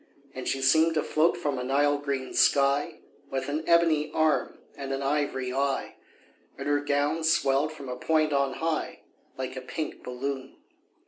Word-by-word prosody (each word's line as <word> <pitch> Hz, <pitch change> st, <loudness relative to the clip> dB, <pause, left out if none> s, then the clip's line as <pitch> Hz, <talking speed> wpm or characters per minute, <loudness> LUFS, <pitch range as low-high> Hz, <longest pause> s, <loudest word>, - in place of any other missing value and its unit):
And 130 Hz, -, -6 dB
she 135 Hz, 0 st, -1 dB
seemed 160 Hz, +4 st, +4 dB
to 155 Hz, -, +1 dB
float 160 Hz, +3 st, +2 dB
from 145 Hz, -6 st, -2 dB
a -, -, -3 dB
Nile 145 Hz, +2 st, +2 dB
green 140 Hz, -2 st, -3 dB
sky, 140 Hz, +1 st, +2 dB, 0.3 s
With 130 Hz, 0 st, -3 dB
an 150 Hz, +2 st, -2 dB
ebony 165 Hz, -3 st, +3 dB
arm 155 Hz, -1 st, +1 dB, 0.2 s
and 135 Hz, -1 st, -6 dB
an 135 Hz, 0 st, -2 dB
ivory 135 Hz, -3 st, -1 dB
eye, 135 Hz, 0 st, -1 dB, 0.6 s
And 140 Hz, -, -5 dB
her 145 Hz, 0 st, +2 dB
gown 145 Hz, +3 st, 0 dB
swelled 155 Hz, -2 st, +2 dB
from 140 Hz, -3 st, -10 dB
a 125 Hz, -, -4 dB
point 155 Hz, +3 st, +1 dB
on 140 Hz, -1 st, +1 dB
high, 160 Hz, -1 st, -2 dB, 0.4 s
Like 130 Hz, 0 st, -4 dB
a 130 Hz, -, -5 dB
pink 130 Hz, +5 st, -5 dB
balloon. 130 Hz, +1 st, -5 dB
140 Hz, 170 wpm, -27 LUFS, 135-155 Hz, 0.6 s, seemed